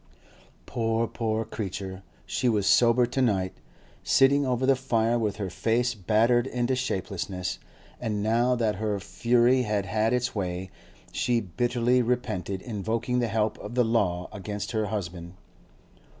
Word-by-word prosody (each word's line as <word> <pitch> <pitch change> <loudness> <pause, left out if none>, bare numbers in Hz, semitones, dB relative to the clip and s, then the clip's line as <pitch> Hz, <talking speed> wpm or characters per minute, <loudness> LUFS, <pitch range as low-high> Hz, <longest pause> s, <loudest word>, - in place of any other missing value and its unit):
Poor, 115 0 0
poor 110 -1 -2
creature. 95 -2 -5 0.2
She 125 - 0
was 105 -4 +1
sober 120 +2 +5
to 125 +2 -2
night, 95 -7 +1 0.5
sitting 140 +1 +4
over 125 0 0
the 135 0 +5
fire 120 -2 +1
with 105 -3 -1
her 100 -4 -4
face 120 +5 +1
battered 115 +4 +2
into 125 0 0
shapelessness; 95 -6 -3 0.4
and 105 -4 -2
now 120 +3 +2
that 110 -4 0
her 105 -1 -1
fury 120 +5 +2
had 105 -4 -1
had 110 +2 +1
its 125 0 0
way, 95 -2 -3 0.4
she 120 -1 +1
bitterly 120 +5 +1
repented 100 -6 -2
invoking 115 +2 -2
the 120 - +1
help 110 -1 0
of 120 - -7
the 125 -1 +3
law 95 -6 0
against 105 0 -5
her 110 -2 0
husband. 90 -4 -5
115 Hz, 145 wpm, -27 LUFS, 100-120 Hz, 0.5 s, sober